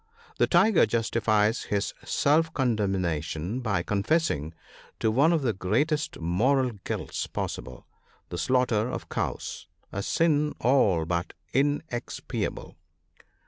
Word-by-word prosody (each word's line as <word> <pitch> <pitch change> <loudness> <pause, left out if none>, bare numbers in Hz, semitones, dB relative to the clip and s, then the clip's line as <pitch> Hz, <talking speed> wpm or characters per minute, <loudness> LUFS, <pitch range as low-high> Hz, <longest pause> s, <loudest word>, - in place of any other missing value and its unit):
— 460 -1 -26
The - - +4
tiger 190 +3 +5
justifies 115 -1 +1
his 100 -1 -1
self 160 +3 +2
condemna 95 - 0
tion 80 - -4
by 100 -8 -1
confessing 100 - 0 0.4
to 110 - +2
one 140 +8 +4
of 165 -4 +1
the 120 -4 +1
greatest 145 - 0
moral 125 +11 +2
guilts - - -3
possible, 65 -1 -5 0.4
the 85 - -4
slaughter 125 -1 +2
of - - -6
cows - - -4
— - - -40
a 100 - -3
sin 150 +4 +1
all 105 -10 +3
but 85 +1 -2 0.2
inexpiable. 145 -2 -2
115 Hz, 125 wpm, -27 LUFS, 95-145 Hz, 0.4 s, tiger